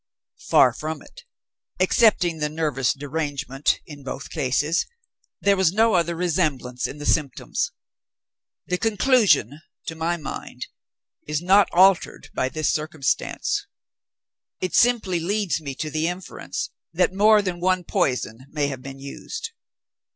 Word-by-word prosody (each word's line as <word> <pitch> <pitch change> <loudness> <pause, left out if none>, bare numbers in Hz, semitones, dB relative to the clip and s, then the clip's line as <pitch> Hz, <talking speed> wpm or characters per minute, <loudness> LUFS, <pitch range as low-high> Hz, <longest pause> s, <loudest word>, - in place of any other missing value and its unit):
"Far - - +6
from 155 -1 -5
it. 485 -1 -16 0.5
Excepting 180 -8 +3
the 150 0 0
nervous 150 -5 0
derangement, 145 -1 -2
in 145 -2 -11
both 135 0 -7
cases, 150 +6 0 0.5
there 200 0 +4
was 190 -4 +3
no 220 +3 +3
other 170 -1 +1
resemblance 155 -8 -1
in 145 - -8
the 145 - -7
symptoms. 140 -5 0 0.9
The 180 0 -1
conclusion, 210 - +3 0.2
to - - -4
my 165 +2 -1
mind, 155 - -7 0.6
is 150 0 -1
not 195 +4 +4
altered 185 +1 +3
by 130 - 0
this 155 +2 0
circumstance. 155 -3 -1 0.9
It 185 - -3
simply 225 -7 +3
leads 195 0 -1
me 140 -3 -6
to 155 +2 -4
the 155 +2 0
inference 180 +2 -5 0.2
that 180 +2 +1
more 210 +2 +5
than 180 -2 -3
one 185 0 +1
poison 125 -4 -1
may 145 -1 -1
have 135 -2 -6
been 135 +1 -8
used. 140 - -7
160 Hz, 135 wpm, -23 LUFS, 145-185 Hz, 0.9 s, Far